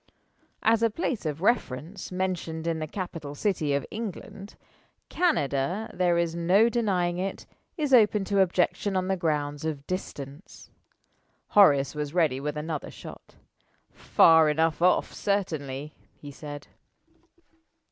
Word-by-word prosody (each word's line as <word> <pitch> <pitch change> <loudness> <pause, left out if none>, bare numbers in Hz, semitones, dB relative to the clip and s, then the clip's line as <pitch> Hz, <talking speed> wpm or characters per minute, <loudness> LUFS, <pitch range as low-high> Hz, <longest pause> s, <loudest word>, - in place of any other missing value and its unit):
As 225 0 +3
a 230 - +4
place 225 - -3
of 150 +1 -4
reference 185 - -1
mentioned 180 -3 -3
in 165 -1 -1
the 155 - -4
capital 165 -5 -6
city 155 -5 0
of 140 - -2
England 205 -2 -7 0.5
Canada, 180 - 0
there 180 -1 +2
is 170 -1 0
no 180 +7 +3
denying 185 -7 0
it, 195 +1 -4 0.3
is 295 -4 -1
open 210 -4 +5
to 200 0 0
objection 190 +2 +1
on 185 0 -1
the 190 - +2
ground 150 -4 -2
of 150 -3 -4
distance. 150 -3 -7 0.8
Horace 145 -9 +5
was 150 +1 -5
ready 155 -7 +2
with 150 +1 -4
another 155 -1 -4
shot. - - -12 0.6
"Far 160 -1 +5
enough 160 +1 +1
off, 180 +1 +3
certainly," 150 -8 -2 0.2
he 145 - -10
said. 145 0 -9
170 Hz, 130 wpm, -27 LUFS, 150-195 Hz, 0.8 s, open